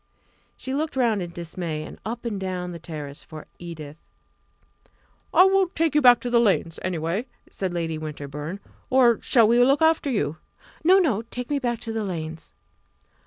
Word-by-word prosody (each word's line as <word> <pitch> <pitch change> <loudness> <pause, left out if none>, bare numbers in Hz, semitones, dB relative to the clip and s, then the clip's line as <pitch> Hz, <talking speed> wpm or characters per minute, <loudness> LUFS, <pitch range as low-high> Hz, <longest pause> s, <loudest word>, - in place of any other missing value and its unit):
She 260 - -5
looked 305 +2 -2
round 230 -6 +2
in 175 - -4
dismay, 170 -2 -5
and - - -10
up 235 +2 -5
and 210 -4 -2
down 180 -2 -3
the 170 - -7
terrace 150 -3 -7
for 155 -1 -10
Edith. 155 -3 -8 1.3
"I 365 - +7
will 385 0 +4
take 330 -3 0
you 300 - +4
back 245 -2 +7
to 245 - -3
the 240 - +5
Lanes, 195 -7 +1
anyway," 180 +6 -2 0.2
said 190 -2 -3
Lady 165 -2 -2
Winterbourne; 150 +3 -6 0.3
"or 250 -3 +4
shall 230 -4 +4
we 240 +2 +5
look 275 +5 +3
after 320 -2 +3
you?" 160 - -1 0.5
"No! 365 +4 +6
no! 275 - +2
Take 250 +2 -5
me 285 - +1
back 240 -3 -1
to 225 - -4
the 220 -1 -2
Lanes." 160 -4 -5
200 Hz, 175 wpm, -24 LUFS, 165-250 Hz, 1.3 s, I